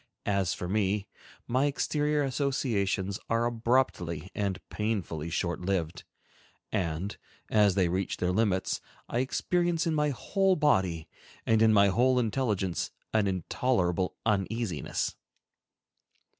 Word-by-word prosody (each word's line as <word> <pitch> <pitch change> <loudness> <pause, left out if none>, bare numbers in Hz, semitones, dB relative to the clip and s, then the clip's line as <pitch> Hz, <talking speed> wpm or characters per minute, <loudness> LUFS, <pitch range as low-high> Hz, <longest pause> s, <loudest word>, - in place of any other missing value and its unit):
As 100 -3 +1
for 90 - -5
me, 100 +1 0 0.4
my 130 +4 +2
exterior 150 +1 0
associations 115 -8 0
are 115 +1 +2
abruptly 115 - 0
and 100 -2 -1
painfully 95 -8 -2
short 85 +1 -2
lived, 90 -3 -2 0.7
and, 90 0 -2 0.4
as 105 -3 +4
they 95 -3 +3
reach 95 +2 -1
their 90 0 0
limits, 95 -2 +1 0.3
I 120 - -1
experience 170 +5 0
in 165 - +1
my 150 -1 +2
whole 190 - +1
body 95 - +1 0.4
and 110 -1 +3
in 110 -1 +6
my 100 -2 +5
whole 125 +6 +3
intelligence 110 -6 0 0.2
an 110 -2 +3
intolerable 95 -1 0
uneasiness. 100 - -1
105 Hz, 115 wpm, -29 LUFS, 95-125 Hz, 0.7 s, in